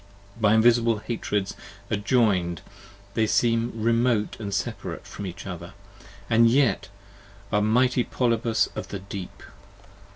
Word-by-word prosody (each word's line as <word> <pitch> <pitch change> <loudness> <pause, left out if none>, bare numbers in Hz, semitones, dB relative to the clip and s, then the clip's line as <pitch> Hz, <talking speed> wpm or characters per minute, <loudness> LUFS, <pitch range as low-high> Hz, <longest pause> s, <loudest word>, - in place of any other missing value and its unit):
By 110 -2 +3
Invisible 115 0 +4
Hatreds 105 -3 -2 0.4
adjoin'd, 100 - +1 0.5
they 110 +1 +1
seem 115 +1 +2
remote 115 -1 +1
and 100 -3 -5
separate - - -4
From 100 - -7
each 90 0 -8
other; 90 -1 -7 0.5
and 115 +1 +5
yet 125 -4 +2 0.6
are 105 - +3
a - - 0
Mighty 125 +4 +3
Polypus 115 -2 +1
in - - -3
the 100 - -4
Deep! 95 -1 -8
110 Hz, 125 wpm, -25 LUFS, 100-115 Hz, 0.6 s, and